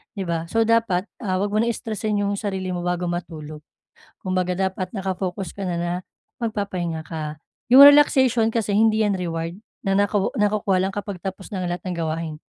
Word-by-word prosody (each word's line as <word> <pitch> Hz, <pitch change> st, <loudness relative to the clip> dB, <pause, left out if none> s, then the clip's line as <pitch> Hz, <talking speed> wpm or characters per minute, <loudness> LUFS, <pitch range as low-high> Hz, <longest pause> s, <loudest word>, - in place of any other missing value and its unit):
'di 195 Hz, -, -3 dB
ba? 165 Hz, -1 st, -2 dB
So, 225 Hz, +5 st, +2 dB
dapat, 225 Hz, -5 st, +2 dB, 0.2 s
ah, 190 Hz, -6 st, -1 dB
huwag 200 Hz, +2 st, -1 dB
mo 215 Hz, -, +1 dB
nang 235 Hz, +1 st, +2 dB
stressin 215 Hz, -1 st, -3 dB
'yong 200 Hz, 0 st, -1 dB
sarili 190 Hz, -3 st, -3 dB
mo 180 Hz, -, -2 dB
bago 175 Hz, 0 st, -1 dB
matulog. 155 Hz, -3 st, -6 dB, 0.6 s
Kumbaga, 185 Hz, -1 st, -1 dB, 0.2 s
dapat 185 Hz, -1 st, -6 dB
naka-focus 190 Hz, -2 st, -4 dB
ka 200 Hz, -, -4 dB
na 180 Hz, -2 st, -2 dB
na 175 Hz, 0 st, -1 dB, 0.4 s
magpapahinga 195 Hz, -8 st, -3 dB
ka. 155 Hz, -2 st, -5 dB, 0.3 s
Yung 265 Hz, -, +10 dB
relaxation 265 Hz, -5 st, +7 dB
kasi 215 Hz, -3 st, 0 dB
hindi 220 Hz, 0 st, +4 dB
'yan 205 Hz, -2 st, +2 dB
reward 165 Hz, -1 st, -4 dB, 0.2 s
na 195 Hz, -1 st, 0 dB
naku 205 Hz, 0 st, +2 dB
nakukuha 210 Hz, -2 st, +1 dB
lang 190 Hz, -, -1 dB
kapag 205 Hz, 0 st, -5 dB
tapos 190 Hz, 0 st, -5 dB
na 190 Hz, -3 st, -3 dB
ang -, -, -1 dB
lahat 175 Hz, -, -5 dB
ng 180 Hz, -, -3 dB
gawain. 160 Hz, -1 st, -3 dB
190 Hz, 185 wpm, -23 LUFS, 175-215 Hz, 0.6 s, Yung